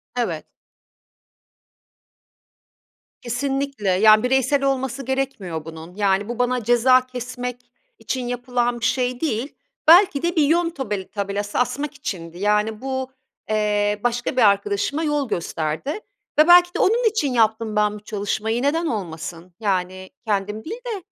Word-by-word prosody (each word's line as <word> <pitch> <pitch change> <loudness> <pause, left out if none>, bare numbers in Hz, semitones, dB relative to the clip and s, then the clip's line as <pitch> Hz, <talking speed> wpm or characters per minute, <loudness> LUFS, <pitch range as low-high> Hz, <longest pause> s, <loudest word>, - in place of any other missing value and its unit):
Evet. 185 -11 -2 2.8
Kesinlikle. 270 -2 -2
Yani, 215 +4 +6
bireysel 265 +2 +2
olması 265 -1 -1
gerekmiyor 230 - -3
bunun. 165 +2 -10
Yani, 200 0 +1
bu 240 0 -5
bana 245 -1 +1
ceza 250 +3 +4
kesmek 250 0 -5 0.4
için 255 -2 -3
yapılan 245 0 -1
bir 235 - -2
şey 250 -1 0
değil. 270 -3 -2 0.3
Belki 335 -3 +7
de 345 0 0
bir 315 - +4
yön 335 +4 +2
tobel 210 - -4
tabelası 205 0 -3
asmak 285 +4 -1
içindi. 175 - -6
Yani, 210 +2 0
bu, 260 0 -3 0.4
eee, 210 -1 +1
başka 245 +1 -1
bir - - +4
arkadaşıma 205 +8 +2
yol 295 -4 0
gösterdi 165 - -3 0.4
ve 305 - +7
belki 355 0 +7
de - - -3
onun 455 +3 +3
için 300 - -1
yaptım 220 -1 +1
ben 210 0 +2
bu - - -8
çalışmayı. 220 +2 -2
Neden 310 +5 +1
olmasın? 175 - -5
Yani, 185 -2 -2 0.2
kendim 210 0 -2
değil 415 - -5
de 435 -5 -3
240 Hz, 135 wpm, -22 LUFS, 205-270 Hz, 2.8 s, Belki